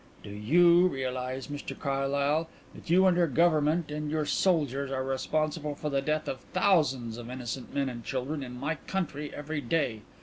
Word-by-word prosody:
"Do 100 - -8
you 170 - +5
realise, 130 -3 -3
Mr 145 -1 -6
Carlyle, 140 +3 0 0.2
that - - -13
you 185 +3 +5
and 185 -2 +5
your 175 -1 +3
Government 155 +1 +2
and 150 0 -3
your 155 0 0
soldiers 145 -7 +1
are 130 -1 -2
responsible 150 +3 -1
for 150 +1 -4
the 135 0 +1
death 155 +2 -1
of 130 - -3
thousands 135 - +2
of 120 0 -8
innocent 125 0 -5
men 140 -1 0
and 120 -2 -6
women 135 +3 -2
in 125 -2 -7
my 150 +4 -2
country 150 -6 -3
every 150 +1 -4
day? 120 -5 0
145 Hz, 175 wpm, -29 LUFS, 130-155 Hz, 0.2 s, you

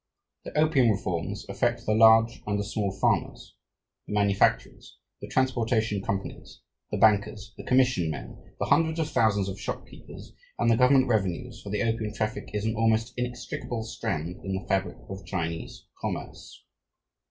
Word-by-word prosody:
The - - -6
opium 150 -6 +4
reforms 90 -5 -2
affect - - -1
the 110 - +2
large 115 +2 +5
and 105 -1 0
the 100 - -1
small 105 -1 -2
farmers, 95 - -1 0.5
the - - -5
manufacturers, 100 -1 +1 0.2
the - - -6
transportation 115 -5 +1
companies, 100 0 -5 0.3
the - - -2
bankers, 105 -1 +2
the - - -9
commission 125 -10 +2
men, 75 - -8
the - - -1
hundreds 160 0 +2
of 160 -1 -1
thousands 100 -3 +2
of 95 +1 -5
shopkeepers, - - -8 0.2
and 115 0 +3
the - - +5
government 130 +2 +5
revenues, 110 +2 -1
for 100 - -8
the 105 +3 0
opium 110 -2 -1
traffic 110 0 -3
is 105 0 -2
an 110 - 0
almost 115 +1 +1
inextricable 120 -1 -4
strand 90 -7 -4
in 95 - -3
the 95 - -5
fabric 95 0 0
of 95 0 -7
Chinese 85 -3 -4
commerce. - - -6
110 Hz, 155 wpm, -27 LUFS, 100-120 Hz, 0.5 s, large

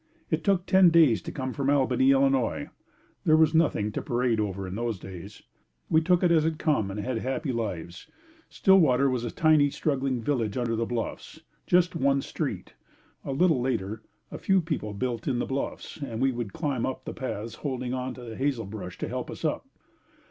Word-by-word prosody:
It - - 0
took 195 -3 +2
ten 190 -2 +6
days 155 - +5
to - - -7
come 130 -1 -4
from 140 -1 -1
Albany, 145 - +3
Illinois. 275 0 +2 0.5
There 155 -4 +5
was 160 0 +4
nothing 150 -10 +2
to - - -3
parade 120 -2 0
over 100 -2 -2
in 90 - -6
those 115 0 -2
days. 90 -2 -10 0.5
We 160 - +5
took 180 +2 +2
it 175 - +4
as 160 -2 +4
it 160 0 0
come 145 -12 +1
and 100 +2 -5
had 115 +3 -2
happy 135 +4 -2
lives. 90 -7 -5 0.4
Stillwater 140 - +4
was 125 -2 -1
a 120 - -2
tiny, 155 +1 +4
struggling 135 -3 -1
village 115 -3 -1
under 120 -2 0
the 115 0 -1
bluffs 120 -2 -5 0.3
just 180 0 +3
one 140 -3 +2
street. - - -4 0.5
A - - -4
little 155 -1 +3
later 110 -4 -2 0.3
a - - -6
few 195 -1 +3
people 150 - -3
built 120 +1 -3
in 130 -3 +1
the 120 - -1
bluffs 135 +1 -4
and 130 -7 -5
we 135 +1 +2
would 120 -5 -4
climb 140 - -2
up 130 - -3
the - - -5
paths 115 -3 -5
holding 130 -3 -3
onto 125 -1 -5
the 110 - -7
hazelbrush 110 -9 -3
to - - -4
help - - -4
us - - -6
up. - - -1
130 Hz, 190 wpm, -27 LUFS, 115-155 Hz, 0.5 s, ten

